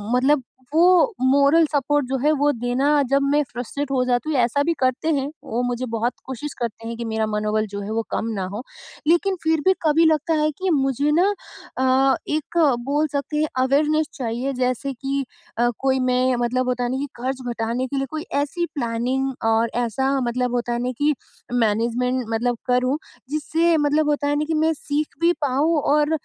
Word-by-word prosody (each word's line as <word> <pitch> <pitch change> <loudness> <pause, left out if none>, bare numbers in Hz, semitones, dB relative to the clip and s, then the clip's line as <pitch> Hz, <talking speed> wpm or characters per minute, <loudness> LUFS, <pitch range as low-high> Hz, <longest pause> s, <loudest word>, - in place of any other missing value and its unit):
मतलब 265 +2 +3 0.3
वो 360 +8 +5
moral 280 +5 +5
support 290 0 +1
जो 265 +1 -1
है 300 - +4
वो 290 +1 +3
देना 245 +2 -1 0.2
जब 275 +1 +3
मैं 295 - +4
फ्रस्ट्रेट 265 +3 -4
हो 260 -2 +2
जाती 250 +4 0
हूँ 280 - +1
ऐसा 245 +4 +2
भी 335 +3 +1
करते 255 +4 0
हैं, 275 -1 -1 0.2
वो 235 +2 -2
मुझे 245 +1 -2
बहुत 230 +2 -1
कोशिश 265 +3 -6
करते 230 -1 -4
हैं 230 - -4
कि 235 - -4
मेरा 220 0 -1
मनोबल 215 0 0
जो 200 0 -6
है 200 - -5
वो 225 +1 0
कम - - -1
ना 190 -2 -2
हो, 220 +4 -5 0.4
लेकिन 345 +4 +3
फिर 320 -1 +2
भी 380 - +6
कभी 320 +1 +4
लगता 315 0 +2
है 305 - +2
कि 380 0 -1
मुझे 280 -1 +1
ना 355 +6 +4 0.5
अ, 260 +1 +3
एक 310 +3 -3 0.3
बोल 295 +3 +1
सकते 285 +1 -2
हैं 310 - +2 0.2
अवेयरनेस 300 +3 +2
चाहिए 255 -1 -3
जैसे 255 +1 -1
कि 275 +2 -2 0.3
अ, 240 - +3
कोई 265 -1 +1
मैं 255 0 +2
मतलब 250 +1 0
होता 250 0 -1
है 240 - -1
ना 260 - -1
कि 285 +2 -3
खर्च 260 +1 -2
घटाने 235 +3 -2
के 275 - -4
लिए 270 - 0
कोई 310 0 -4 0.2
ऐसी 345 +5 -2
प्लानिंग 255 +1 -1 0.2
और 225 +1 +2 0.2
ऐसा 265 +4 -1
मतलब 245 0 -1
होता 240 0 -1
है 235 - -1
ना 250 - -1
कि 295 +2 +2 0.4
मैनेजमेंट 240 +2 +1
मतलब 235 +2 0
करूँ, 255 +3 +2 0.3
जिससे 320 +3 +1
मतलब 295 0 +2
होता 290 -1 0
है 290 - +1
ना 305 - 0
कि 320 - -2
मैं 320 +1 +2
सीख 295 0 -3
भी 340 +1 +4
पाऊँ 295 +4 +2
और 295 +2 +2
270 Hz, 200 wpm, -22 LUFS, 245-300 Hz, 0.5 s, भी